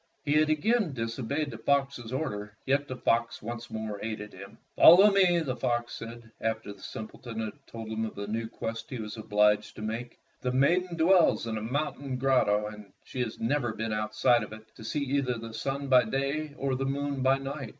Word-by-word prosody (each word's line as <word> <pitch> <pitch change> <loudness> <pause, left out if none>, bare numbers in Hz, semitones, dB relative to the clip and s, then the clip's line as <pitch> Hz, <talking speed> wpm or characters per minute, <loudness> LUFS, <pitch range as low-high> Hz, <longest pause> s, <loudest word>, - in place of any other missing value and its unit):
He 145 - +2
had 155 0 +4
again 180 +3 +2
disobeyed 130 +5 -2
the 115 - -8
fox's 135 -2 0
orders, 105 -7 -3 0.2
yet 140 +2 +1
the 130 - -4
fox 115 -2 +1
once 120 +1 -6
more 110 -2 -4
aided 105 -1 -5
him. 100 +1 -11 0.2
"Follow 195 +5 +9
me," 185 -3 +4
the 130 -5 -2
fox 120 -3 -1
said, 115 0 -8
after 110 -2 -2
the 100 - -18
simpleton 110 +2 -7
had 115 +6 -6
told 115 -1 -7
him 110 0 -2
of 110 - -7
the 100 - -4
new 110 +2 -2
quest 115 0 -5
he 130 - -4
was 105 -2 -6
obliged 105 -1 +2
to 110 - -7
make. 115 +3 -4 0.2
"The 125 - 0
maiden 170 +7 +2
dwells 170 -5 +4
in 115 -1 -3
a 110 - -3
mountain 135 +2 -2
grotto, 125 -6 +3
and 105 -2 -9
she 130 - -8
has 120 -3 -2
never 120 0 0
been 110 0 -3
outside 110 +2 +2
of 105 - -6
it 110 0 -13
to - - -12
see 145 +6 -2
either 135 -2 0
the 115 0 -8
sun 135 +5 -3
by 125 -3 +6
day 140 +5 -2
or 135 -1 -1
the 135 +1 -1
moon 140 0 -2
by 135 +1 +4
night." 135 -2 -5
120 Hz, 205 wpm, -29 LUFS, 110-140 Hz, 0.2 s, Follow